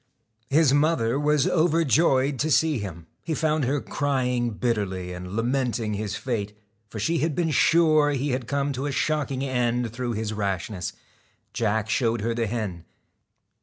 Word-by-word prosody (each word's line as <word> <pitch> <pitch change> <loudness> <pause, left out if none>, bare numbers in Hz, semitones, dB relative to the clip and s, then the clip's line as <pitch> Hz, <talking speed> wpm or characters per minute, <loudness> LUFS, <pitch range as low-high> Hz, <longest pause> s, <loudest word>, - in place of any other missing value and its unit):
His 145 -1 +4
mother 145 -4 +2
was 150 -1 +2
overjoyed 155 -5 +2
to 155 - 0
see 155 -2 +3
him; 85 -5 -7 0.2
he 160 - -3
found 155 -3 +1
her 140 +3 0
crying 125 -4 -1
bitterly, 100 -6 -2
and 90 +2 -7
lamenting 120 -2 0
his 105 0 -3
fate, 110 -3 -3 0.3
for 110 - -8
she 160 +10 0
had 155 -1 -1
made 165 -3 +1
sure 155 -1 +4
he 140 0 -1
had 125 -2 -2
come 140 0 -1
to 135 +3 -3
a - - -2
shocking 140 -2 -1
end 120 -3 0
through 120 -1 -3
his 110 0 -3
rashness. 100 -3 -3 0.6
Jack 110 -2 0
showed 115 -1 +1
her 115 +2 -1
the 115 -1 -1
hen. 100 -6 -4
125 Hz, 160 wpm, -25 LUFS, 110-145 Hz, 0.6 s, His